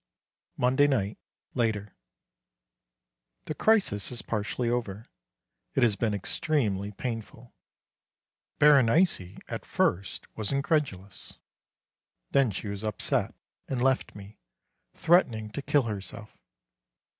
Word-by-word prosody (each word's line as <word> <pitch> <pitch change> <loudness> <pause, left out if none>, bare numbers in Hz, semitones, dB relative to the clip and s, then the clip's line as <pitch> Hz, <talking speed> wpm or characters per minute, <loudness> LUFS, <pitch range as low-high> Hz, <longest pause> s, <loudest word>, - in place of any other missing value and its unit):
Monday 130 +3 +4
night, 110 -7 0 0.3
later. 105 -4 -1 1.5
The - - -3
crisis 170 - +2
is 120 - -6
partially 115 +2 -2
over. 115 -3 -2 0.7
It - - +3
has 110 -4 +4
been 105 0 0
extremely 105 - -1
painful. 115 +1 -6 1.0
Berenice 140 - +4
at - - -5
first 95 +2 -1
was 110 -2 -3
incredulous. 140 - -2 0.9
Then 135 -3 +4
she 105 +1 -5
was 100 +1 -5
upset, 105 -3 -1 0.3
and 130 - -2
left 130 +1 +1
me, 100 +1 -12 0.6
threatening 115 -11 +3
to 140 - -4
kill 145 0 +2
herself. 105 0 -6
115 Hz, 100 wpm, -28 LUFS, 100-135 Hz, 1.5 s, Monday